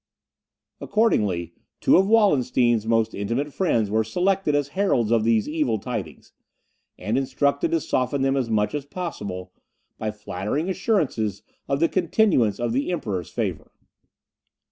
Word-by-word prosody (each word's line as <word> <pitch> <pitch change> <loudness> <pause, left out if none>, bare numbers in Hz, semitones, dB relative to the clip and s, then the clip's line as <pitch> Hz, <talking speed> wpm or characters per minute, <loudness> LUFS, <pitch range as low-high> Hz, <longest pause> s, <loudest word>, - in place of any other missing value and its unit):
Accordingly, 100 - +1 0.3
two - - +4
of 190 +1 +4
Wallenstein's 125 - +3
most 115 -1 +2
intimate 120 +8 -2
friends 115 - +1
were 110 +1 +2
selected 180 - 0
as 145 -1 0
heralds 145 - +1
of 115 -2 +3
these 115 -1 +2
evil 150 -7 0
tidings, 100 - -6 0.6
and 115 +5 -1
instructed 140 - 0
to 335 0 +1
soften 135 - -1
them 135 0 +2
as 130 -4 -1
much 105 -1 +1
as 145 -2 -3
possible, 105 - -6 0.5
by 110 - -2
flattering 105 - -3
assurances 155 - -1 0.2
of 140 - 0
the 165 - +4
continuance 175 - +2
of 120 -1 -1
the 140 +7 0
Emperor's 100 - -3
favour. - - -4
125 Hz, 140 wpm, -24 LUFS, 110-165 Hz, 0.6 s, two